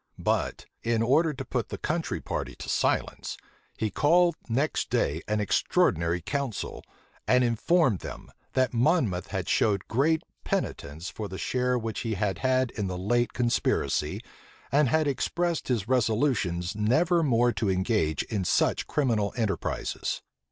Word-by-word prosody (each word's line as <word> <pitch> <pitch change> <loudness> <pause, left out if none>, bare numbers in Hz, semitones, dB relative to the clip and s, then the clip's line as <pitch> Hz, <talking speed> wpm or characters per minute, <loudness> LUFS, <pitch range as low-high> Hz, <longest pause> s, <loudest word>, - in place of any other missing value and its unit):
But, - - -1 0.2
in 115 -1 +1
order 155 +7 +3
to 145 - -6
put - - -2
the - - -5
country - - -2
party - - -4
to - - -9
silence, - - 0 0.4
he 110 -2 -1
called 170 - +4 0.2
next 135 +7 0
day 75 +4 0
an 105 0 0
extraordinary 85 -4 +1
council, 135 - -3 0.4
and 125 0 +4
informed 120 - +2
them, - - -9 0.2
that 130 -1 +2
Monmouth 120 - +2
had - - -3
showed 100 -3 +1
great 150 +7 +2 0.2
penitence 80 +5 -3
for 105 - -5
the 95 -1 -7
share 125 +3 0
which 115 -2 -3
he 115 -2 -2
had 100 0 -1
had 130 -1 +2
in 105 -4 -3
the 90 -1 -3
late 120 +5 +1
conspiracy, 120 -1 0 0.5
and 145 -2 +4
had 155 +2 +2
expressed 170 +4 -1
his 115 -6 0
resolutions 110 -7 +1
never 155 - +3
more 120 -5 +3
to 105 - -1
engage 95 -4 +1
in 105 -4 -2
such - - +1
criminal 115 -8 +1
enterprises. 105 -6 -2
115 Hz, 145 wpm, -27 LUFS, 100-135 Hz, 0.5 s, called